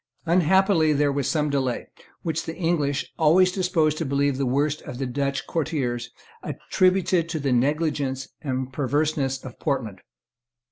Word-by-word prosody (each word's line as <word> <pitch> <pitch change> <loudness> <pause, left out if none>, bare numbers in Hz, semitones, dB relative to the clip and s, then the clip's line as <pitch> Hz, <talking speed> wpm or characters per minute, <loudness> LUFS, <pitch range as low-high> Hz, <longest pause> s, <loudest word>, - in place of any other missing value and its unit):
Unhappily 175 -1 +4
there 145 0 +2
was 140 -2 -1
some 150 -2 0
delay, 130 -3 -1 0.4
which 160 -1 -2
the 165 - -5
English, 155 -5 -1
always 180 +4 +5
disposed 165 -5 +1
to - - 0
believe 140 -1 0
the 135 - 0
worst 145 +4 0
of 125 - -8
the 135 - -2
Dutch 140 +2 -2
courtiers, 125 -7 -2 0.3
attributed 185 -2 +1
to 160 -2 -2
the 140 -2 -1
negligence 135 0 0 0.2
or 130 -2 -1
perverseness 140 0 0
of 125 - -9
Portland. 125 - -2
145 Hz, 145 wpm, -24 LUFS, 135-165 Hz, 0.4 s, always